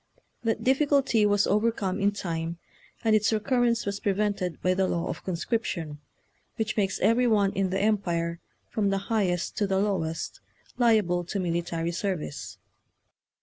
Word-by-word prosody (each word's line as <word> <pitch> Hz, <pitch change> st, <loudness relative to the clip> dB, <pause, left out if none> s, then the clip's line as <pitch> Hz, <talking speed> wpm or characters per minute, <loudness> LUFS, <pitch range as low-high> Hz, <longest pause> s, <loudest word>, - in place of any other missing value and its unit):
That 225 Hz, -2 st, -1 dB
difficulty 270 Hz, -5 st, +3 dB
was 205 Hz, 0 st, +3 dB
overcome 210 Hz, -2 st, +1 dB
in 200 Hz, 0 st, +3 dB
time, 170 Hz, -4 st, -4 dB, 0.5 s
and 220 Hz, -1 st, +4 dB
its 215 Hz, 0 st, +3 dB
recurrence 235 Hz, +2 st, +1 dB
was 200 Hz, 0 st, -2 dB
prevented 200 Hz, -3 st, -1 dB
by 185 Hz, -, +3 dB
the 190 Hz, 0 st, +1 dB
law 170 Hz, -2 st, -1 dB
of -, -, -5 dB
conscription, 170 Hz, -5 st, -2 dB, 0.6 s
which 220 Hz, -1 st, -2 dB
makes 200 Hz, -2 st, 0 dB
every 245 Hz, +2 st, +4 dB
one 205 Hz, -3 st, +3 dB
in 195 Hz, -1 st, 0 dB
the 190 Hz, -, -1 dB
Empire, 170 Hz, -5 st, 0 dB, 0.3 s
from 205 Hz, -2 st, 0 dB
the 195 Hz, +3 st, -2 dB
highest 180 Hz, -5 st, 0 dB
to 205 Hz, -, +1 dB
the 190 Hz, 0 st, +1 dB
low 195 Hz, -2 st, +1 dB
est, 160 Hz, 0 st, -4 dB, 0.4 s
liable 215 Hz, -8 st, +3 dB
to 195 Hz, +3 st, -3 dB
military 170 Hz, -1 st, -1 dB
service. 150 Hz, -, -4 dB
200 Hz, 150 wpm, -27 LUFS, 175-215 Hz, 0.6 s, and